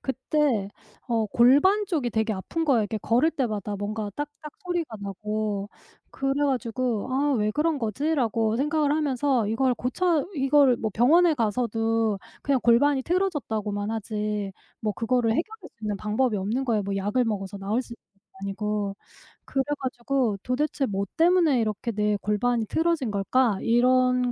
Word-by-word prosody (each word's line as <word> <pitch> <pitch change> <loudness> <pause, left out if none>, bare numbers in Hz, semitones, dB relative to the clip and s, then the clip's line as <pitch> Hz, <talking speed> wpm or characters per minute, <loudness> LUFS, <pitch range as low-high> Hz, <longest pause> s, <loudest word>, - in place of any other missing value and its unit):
그때 265 -5 0 0.4
어 230 -3 0
골반 285 - +4
쪽이 305 -10 -1
되게 220 0 0
아픈 320 - -3
거예요 265 -7 +3
이렇게 210 +1 -2
걸을 245 +10 +2
때마다 215 - -2
뭔가 205 +1 -4
딱딱 295 +1 -6
소리가 340 -10 -3
나고. 205 +1 -3 0.4
그래 270 0 -1
가지고 245 -3 -1
'아 285 +2 +2
왜 210 -1 +1
그런 300 +5 0
거지?'라고 230 -2 0
생각을 295 +2 +1
하면서 275 -5 +1
이걸 250 +3 +1
고쳐 310 +6 0
이걸 275 -2 +4
뭐 220 - -3
병원에 320 +8 +5
가서도 225 -2 0 0.2
그냥 280 -2 +2
골반이 265 +4 +4
틀어졌다고만 225 - -1
하지 210 -2 -3 0.3
뭐 215 -1 -1
그거를 230 -1 +1
해결할 435 - -2
수 - - -44
있는 210 -1 -2
방법이 215 +3 0
없는 220 +8 -1
거예요. 225 -5 +1
뭐 200 0 -2
약을 205 +6 +1
먹어서 200 -3 -3
나을 205 +6 -1
수 240 - -12
있는 235 - -14
것도 195 -1 -25
아니고. 205 0 -2 0.5
그래 270 - 0 0.2
가지고 250 -3 -1
'도대체 270 +3 -1
뭐 200 -1 -2
때문에 330 -5 +4
이렇게 215 +1 -2
내 210 -1 0
골반이 220 +3 0
틀어진 320 -1 0
걸까?' 205 +2 +1
이런 250 +1 +3
235 Hz, 335 characters per minute, -25 LUFS, 210-280 Hz, 0.5 s, 병원에